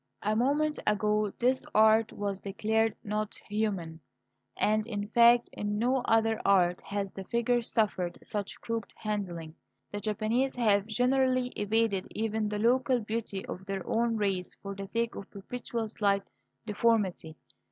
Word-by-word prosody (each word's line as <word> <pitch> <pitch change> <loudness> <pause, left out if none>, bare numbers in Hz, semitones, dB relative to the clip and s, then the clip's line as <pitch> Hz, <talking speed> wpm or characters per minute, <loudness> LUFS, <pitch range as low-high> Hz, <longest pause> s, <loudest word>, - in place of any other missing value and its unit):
A 215 +1 +1
moment 290 +6 +1
ago 210 0 +2
this 255 +2 +1
art 220 +1 +5
was 200 -1 -3
declared 220 +2 0
not 210 0 -2
human. 195 -7 -2 0.6
And, 215 +1 +2
in 205 -3 -4
fact, 235 +1 +6
in 205 0 -2
no 250 +4 +2
other 225 -1 +2
art 180 -3 +3
has 200 -1 -4
the 195 - -6
figure 240 +2 +1
suffered 200 -6 -1
such 205 -2 -5
crooked 230 -1 -4
handling. 180 -7 -4 0.4
The 205 - -4
Japanese 220 +5 0
have 210 -4 +2
generally 255 +2 +2
evaded 210 -3 0
even 220 -1 -1
the 210 - -2
local 245 +3 +3
beauty 215 -3 -4
of 185 - -7
their 195 -2 -3
own 230 0 +1
race 195 -4 -1
for 200 0 -4
the 195 0 -6
sake 230 +3 -1
of 200 - -8
perpetual 230 +2 -5
slight 200 -2 +1 0.4
deformity. 210 -7 +1
215 Hz, 145 wpm, -30 LUFS, 200-230 Hz, 0.6 s, fact